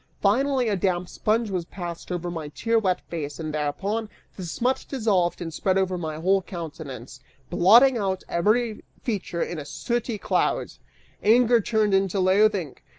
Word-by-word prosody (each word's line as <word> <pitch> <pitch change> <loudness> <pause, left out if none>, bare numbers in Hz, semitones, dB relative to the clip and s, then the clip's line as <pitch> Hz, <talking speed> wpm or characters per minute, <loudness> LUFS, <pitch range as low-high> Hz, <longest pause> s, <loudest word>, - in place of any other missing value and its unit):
Finally, 255 +5 +2
a 210 - +1
damp 180 -1 0
sponge 215 +3 0
was 180 -2 -1
passed 175 -1 -7
over 175 0 -3
my 160 -3 -5
tear 230 +9 0
wet 185 -4 +1
face, 150 -3 -6
and 155 -2 -4
thereupon, 195 +9 -2 0.3
the 190 - -7
smut 245 +10 -1
dissolved 205 -9 +1
and 165 -2 -5
spread 190 +3 +1
over 190 -1 +1
my 160 -3 -4
whole 190 +5 +2
countenance, 150 -9 -8 0.3
blotting 230 +9 +6
out 190 -2 -1
every 215 +6 +1 0.2
feature 190 -7 -2
in 175 - -5
a - - -5
sooty 235 - -3
cloud. - - 0 0.5
Anger 235 +2 +5
turned 215 -1 +1
into 195 0 +2
loathing. 190 -4 +2
190 Hz, 155 wpm, -25 LUFS, 170-220 Hz, 0.5 s, blotting